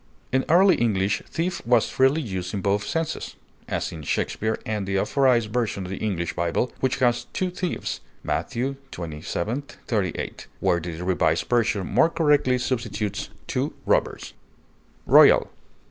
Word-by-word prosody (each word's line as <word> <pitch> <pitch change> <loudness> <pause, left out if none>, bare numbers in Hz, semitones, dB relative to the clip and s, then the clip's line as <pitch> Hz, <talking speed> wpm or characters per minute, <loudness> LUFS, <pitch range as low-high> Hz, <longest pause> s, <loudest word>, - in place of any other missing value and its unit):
In 130 +1 +1
early 185 +3 +6
English 100 -4 +1
thief 175 +1 -2
was 120 -1 +3
freely 135 +4 +3
used 95 -4 -4
in 100 - -2
both 100 +1 0
senses, 165 -1 -3 0.3
as - - -2
in 80 - -7
Shakespeare 110 +9 -1
and 105 -3 -2
the 95 0 0
Authorized 120 -1 +2
Version 115 -6 -1
of 90 - -7
the 95 - -4
English 90 -6 -2
Bible, 85 +9 0
which 130 -1 +1
has 120 -2 +2
"two 185 -1 -1
thieves" 180 0 -3 0.2
(Matt. - - -1
xxvii, 135 +3 -2 0.5
38), 110 - -3
where 90 -3 +2
the 85 0 -6
Revised 85 -3 +1
Version 115 -5 +1
more 165 - +3
correctly 145 -6 +3
substitutes 115 -5 -2 0.2
"two - - -2
robbers." - - 0 0.7
ROYAL. - - +6
115 Hz, 145 wpm, -24 LUFS, 95-130 Hz, 0.7 s, early